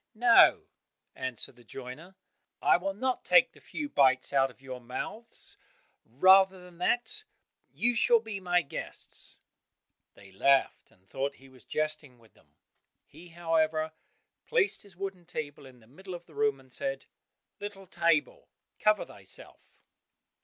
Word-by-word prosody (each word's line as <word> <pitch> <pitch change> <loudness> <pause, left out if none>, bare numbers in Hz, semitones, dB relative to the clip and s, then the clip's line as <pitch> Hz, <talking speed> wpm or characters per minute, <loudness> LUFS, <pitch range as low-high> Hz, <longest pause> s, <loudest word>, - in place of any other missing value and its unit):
"No," 235 +1 +6 0.5
answered 130 -1 -5
the 120 - -17
joiner, 135 - -10 0.4
"I - - +5
will 195 +2 -3
not 255 +4 -1
take - - +5
the - - -20
few 295 - -5
bites 135 - +3
out 135 -1 +4
of 125 - -18
your 130 -2 -8
mouths; 215 - -8 0.5
rather 190 +9 +5
than 180 -1 -15
that, 240 - 0 0.5
you 245 +1 +1
shall 235 +1 +4
be 220 -3 -6
my 180 -2 +2
guests." 140 - -8 0.8
They 100 - -16
laughed, 135 +8 +2
and 95 -4 -29
thought 140 +6 -3
he 135 0 -17
was 130 -3 -18
jesting 155 -4 -3
with 115 -2 -23
them; - - -28 0.5
he, 165 +4 -15
however, 160 -2 0 0.6
placed 465 -4 +1
his 195 -4 -18
wooden 190 -2 -5
table 145 -4 -6
in 125 -2 -17
the - - -20
middle 185 - -9
of 175 0 -10
the - - -19
room, 215 -9 +1
and 130 -1 -20
said, 135 0 -3 0.5
"Little 205 -1 -7
table, 170 -4 0 0.3
cover 215 0 +3
thyself." - - -11
165 Hz, 145 wpm, -30 LUFS, 135-195 Hz, 0.8 s, No